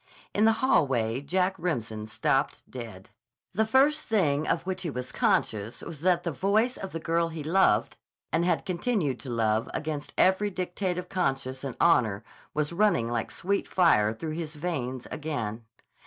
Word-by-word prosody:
In 210 Hz, -, +3 dB
the 225 Hz, -, +6 dB
hallway 130 Hz, -, +2 dB
Jack 185 Hz, +6 st, +1 dB
Remsen 115 Hz, -11 st, -3 dB
stopped 110 Hz, -, 0 dB
dead. 110 Hz, -7 st, -9 dB, 0.4 s
The 220 Hz, +3 st, +1 dB
first 280 Hz, +6 st, +4 dB
thing 155 Hz, -9 st, +1 dB
of 165 Hz, -, +1 dB
which 190 Hz, 0 st, -3 dB
he 175 Hz, -, -2 dB
was 125 Hz, -2 st, -5 dB
conscious 110 Hz, -1 st, 0 dB
was 160 Hz, -4 st, -8 dB
that 175 Hz, 0 st, +2 dB
the 170 Hz, -, -1 dB
voice 210 Hz, -, +1 dB
of 190 Hz, -, -6 dB
the 165 Hz, -, -4 dB
girl 165 Hz, +1 st, +1 dB
he 160 Hz, -2 st, -6 dB
loved 185 Hz, +5 st, +2 dB, 0.4 s
and 165 Hz, -, +3 dB
had 180 Hz, -, +1 dB
continued 180 Hz, -, -1 dB
to 135 Hz, -, -8 dB
love 110 Hz, -2 st, +1 dB
against 150 Hz, -1 st, -4 dB
every 190 Hz, +3 st, +4 dB
dictate 180 Hz, -1 st, -2 dB
of 180 Hz, 0 st, -4 dB
conscience 135 Hz, -7 st, -1 dB
and 135 Hz, -3 st, -5 dB
honor 110 Hz, -11 st, +3 dB, 0.3 s
was 150 Hz, +2 st, 0 dB
running 170 Hz, -, +2 dB
like 115 Hz, -1 st, -1 dB
sweet 200 Hz, +2 st, -1 dB
fire 110 Hz, -, +4 dB
through 155 Hz, +8 st, -5 dB
his 160 Hz, -1 st, -5 dB
veins 130 Hz, -6 st, -3 dB
again. 120 Hz, -8 st, -4 dB
160 Hz, 170 wpm, -28 LUFS, 125-185 Hz, 0.4 s, the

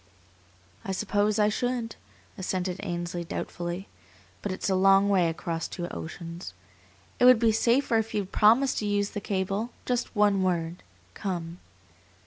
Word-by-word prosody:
"I 190 Hz, -, -3 dB
suppose 205 Hz, +2 st, +1 dB
I 210 Hz, -1 st, +4 dB
should," 240 Hz, +1 st, -2 dB, 0.4 s
assented 185 Hz, -1 st, -2 dB
Ainsley, 175 Hz, -2 st, -3 dB
doubtfully; 175 Hz, +2 st, -5 dB, 0.5 s
"but -, -, -3 dB
it's 185 Hz, -, -3 dB
a 195 Hz, -, +2 dB
long 195 Hz, +1 st, +5 dB
way 185 Hz, -4 st, +3 dB
across 165 Hz, 0 st, -3 dB
two 175 Hz, -1 st, -5 dB
oceans. 170 Hz, -, -7 dB, 0.6 s
It -, -, +5 dB
would 255 Hz, -1 st, +9 dB
be 225 Hz, 0 st, +3 dB
safer 235 Hz, +1 st, +2 dB
if 225 Hz, 0 st, -3 dB
you'd 200 Hz, -2 st, -2 dB
promise 235 Hz, +6 st, +5 dB
to 210 Hz, -, -2 dB
use 205 Hz, 0 st, 0 dB
the 205 Hz, -, -4 dB
cable. 195 Hz, +3 st, -1 dB, 0.2 s
Just 245 Hz, -1 st, -1 dB
one 205 Hz, -2 st, +3 dB
word: 175 Hz, -2 st, -1 dB, 0.3 s
'Come. 175 Hz, -3 st, -4 dB
195 Hz, 145 wpm, -27 LUFS, 175-215 Hz, 0.6 s, would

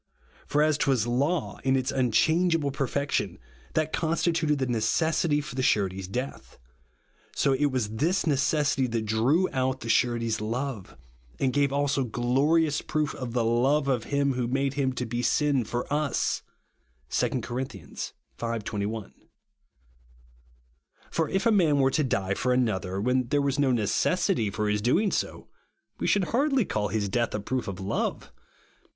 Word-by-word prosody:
For 150 Hz, +1 st, +2 dB
as 155 Hz, -1 st, +2 dB
t 140 Hz, -, +1 dB
was 125 Hz, -5 st, +2 dB
law, 140 Hz, +8 st, -1 dB
in 135 Hz, 0 st, +2 dB
its 130 Hz, +1 st, 0 dB
unchangeable 160 Hz, +5 st, +2 dB
perfection, 135 Hz, -, -1 dB, 0.4 s
that 155 Hz, 0 st, 0 dB
constituted 165 Hz, -2 st, +1 dB
the 135 Hz, -, 0 dB
necessity 150 Hz, +6 st, +1 dB
for 150 Hz, -, -8 dB
the 130 Hz, -, -2 dB
Surety's 95 Hz, -6 st, +1 dB
death, 125 Hz, +8 st, -5 dB, 0.8 s
so 140 Hz, -, +2 dB
it 145 Hz, +2 st, +2 dB
was 130 Hz, -5 st, -1 dB
this 170 Hz, -, +1 dB
necessity 140 Hz, -2 st, +2 dB
that 115 Hz, -2 st, -2 dB
drew 125 Hz, -, +2 dB
out 130 Hz, 0 st, 0 dB
the 115 Hz, -, -6 dB
Surety's 115 Hz, -2 st, +1 dB
love, 115 Hz, -, -4 dB, 0.4 s
and 130 Hz, -2 st, +1 dB
gave 140 Hz, -1 st, +2 dB
also 140 Hz, -1 st, +1 dB
glorious 140 Hz, +7 st, +1 dB
proof 150 Hz, -2 st, -1 dB
of 125 Hz, -3 st, -6 dB
the 120 Hz, -2 st, +1 dB
love 135 Hz, +5 st, +2 dB
of 125 Hz, -5 st, 0 dB
him 140 Hz, -1 st, +1 dB
who 125 Hz, -1 st, -1 dB
made 135 Hz, +2 st, 0 dB
him 135 Hz, -2 st, 0 dB
to 125 Hz, 0 st, -3 dB
be 120 Hz, +1 st, -2 dB
sin 140 Hz, +1 st, +2 dB
for 120 Hz, +2 st, -3 dB
us 150 Hz, -1 st, 0 dB, 0.7 s
(2 -, -, 0 dB
Cor. 125 Hz, +2 st, -3 dB
v. 115 Hz, -, -6 dB
21). 105 Hz, +1 st, -4 dB, 2.0 s
For 160 Hz, -2 st, 0 dB
if 195 Hz, +3 st, 0 dB
a 230 Hz, -, +5 dB
man 170 Hz, -8 st, +4 dB
wcTG 135 Hz, -1 st, +3 dB
to 155 Hz, -, +2 dB
die 100 Hz, -7 st, 0 dB
for 125 Hz, +5 st, 0 dB
another, 100 Hz, -7 st, 0 dB
when 125 Hz, +3 st, +1 dB
there 145 Hz, +3 st, +1 dB
was 140 Hz, 0 st, 0 dB
no 140 Hz, -, +3 dB
RIGHTEOUS 125 Hz, -, +2 dB
GRACE. 105 Hz, -1 st, 0 dB
47 -, -, +3 dB
necessity 180 Hz, -, +1 dB
for 105 Hz, +1 st, -2 dB
his 105 Hz, 0 st, 0 dB
doing 185 Hz, -, +2 dB
so, -, -, -3 dB, 0.5 s
we -, -, -1 dB
should 200 Hz, -, +3 dB
hardly 270 Hz, -, +2 dB
all 105 Hz, -1 st, 0 dB
his 105 Hz, -2 st, -1 dB
death 120 Hz, +2 st, 0 dB
a -, -, -1 dB
proof 125 Hz, +5 st, -3 dB
of 95 Hz, -2 st, -5 dB
love. 95 Hz, +1 st, -2 dB
130 Hz, 170 wpm, -27 LUFS, 115-150 Hz, 2.0 s, a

